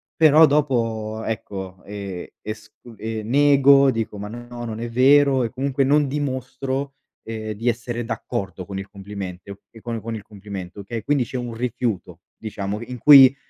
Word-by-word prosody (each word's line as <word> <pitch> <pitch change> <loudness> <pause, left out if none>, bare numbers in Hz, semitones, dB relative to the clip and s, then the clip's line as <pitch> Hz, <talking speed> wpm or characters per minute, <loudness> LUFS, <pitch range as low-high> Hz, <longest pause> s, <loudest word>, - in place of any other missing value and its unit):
però 155 0 +7
dopo 115 -7 0
ecco, 95 -4 -5
ehm, 100 -3 -6 0.2
esc 110 0 -7 0.3
ehm, 110 -1 -4
nego, 140 +1 +6
dico: 115 -3 -3
"Ma 100 +1 -5
no, 120 +1 -8
non 110 -1 -5
è 120 +1 -4
vero" 135 +2 +5
e 115 - -1
comunque 135 +1 0
non 145 +1 +3
dimostro, 135 0 -3 0.3
ehm, 110 -1 -5
di 115 +4 0
essere 120 0 -3
d'accordo 95 -7 -4
con 100 0 -6
il 95 - -7
complimento 100 -1 -8
e 115 - -14
con 115 -1 -4
con 115 +1 -4
il 105 - -7
complimento, 100 -2 -8
okay, 115 +2 -5
quindi 140 0 +1
c'è 130 - -5
un 120 -1 -4
rifiuto 115 -7 -3 0.2
diciamo, 105 0 -4
in 125 +1 -7
cui 135 +1 +9
115 Hz, 165 wpm, -22 LUFS, 105-130 Hz, 0.3 s, cui